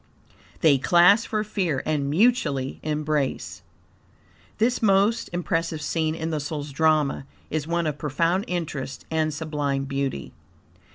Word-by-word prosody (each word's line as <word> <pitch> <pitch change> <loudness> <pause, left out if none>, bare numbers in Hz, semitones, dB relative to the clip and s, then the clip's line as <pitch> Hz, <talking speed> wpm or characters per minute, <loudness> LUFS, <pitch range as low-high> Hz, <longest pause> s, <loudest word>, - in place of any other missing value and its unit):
"They 145 -4 +5
clasp 180 - +5
for 215 -1 -1
fear 180 -10 -1
and 145 -3 0
mutually 155 - +1
embrace." 150 -2 -2 1.0
This 235 +3 +1
most 205 +1 +3
impressive 165 -2 -1
scene 160 0 -1
in 165 0 -3
the 155 - -1
soul's 145 0 -5
drama 150 -2 +1 0.2
is 155 -1 -2
one 170 0 0
of 150 -2 -2
profound 165 +6 0
interest 150 -6 -4
and 155 -1 +1
sublime 145 -2 -2
beauty. 135 - -3
155 Hz, 125 wpm, -24 LUFS, 145-175 Hz, 1.0 s, They